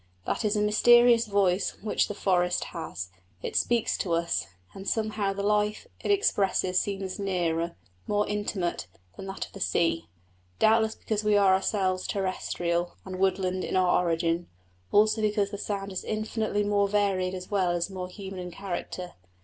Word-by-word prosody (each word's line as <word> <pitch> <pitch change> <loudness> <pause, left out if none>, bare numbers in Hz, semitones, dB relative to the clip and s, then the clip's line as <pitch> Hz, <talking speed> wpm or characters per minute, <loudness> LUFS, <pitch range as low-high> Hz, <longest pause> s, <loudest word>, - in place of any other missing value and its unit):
That - - -1
is 210 0 +1
a 210 - +2
mysterious 240 +2 +6
voice 195 -2 +1
which 215 - +1
the 205 - -5
forest 180 -3 +1
has: 90 +1 -5 0.3
it - - -4
speaks 235 -2 +2
to 175 - -1
us, 170 0 0 0.3
and 195 0 -4
somehow 215 -2 0
the 200 0 -4
life 210 - +1 0.2
it - - -2
expresses 195 - +2
seems 195 -1 -4
nearer, 170 -4 -1 0.3
more 210 0 +1
intimate, 195 - -2 0.3
than 195 - -8
that 195 - -4
of - - -18
the 195 - -9
sea. 165 -2 +1 0.5
Doubtless 220 0 +3
because 215 -1 -2
we 210 -1 +4
are 195 -2 +5
ourselves 190 -1 0
terrestrial 175 -3 -1
and 185 -1 -6
woodland 185 -1 +1
in - - -3
our 180 -1 +3
origin; 165 0 0 0.4
also 215 +1 +4
because 210 -1 +1
the 205 - -5
sound 200 -1 -3
is 190 - -4
infinitely 215 -1 -1
more 205 0 +2
varied 195 -2 +1
as 185 +2 -8
well 190 -3 +2
as 175 +2 -1
more 180 -1 -5
human 190 0 -8
in 180 0 -5
character. 180 -1 -5
195 Hz, 165 wpm, -27 LUFS, 180-210 Hz, 0.5 s, mysterious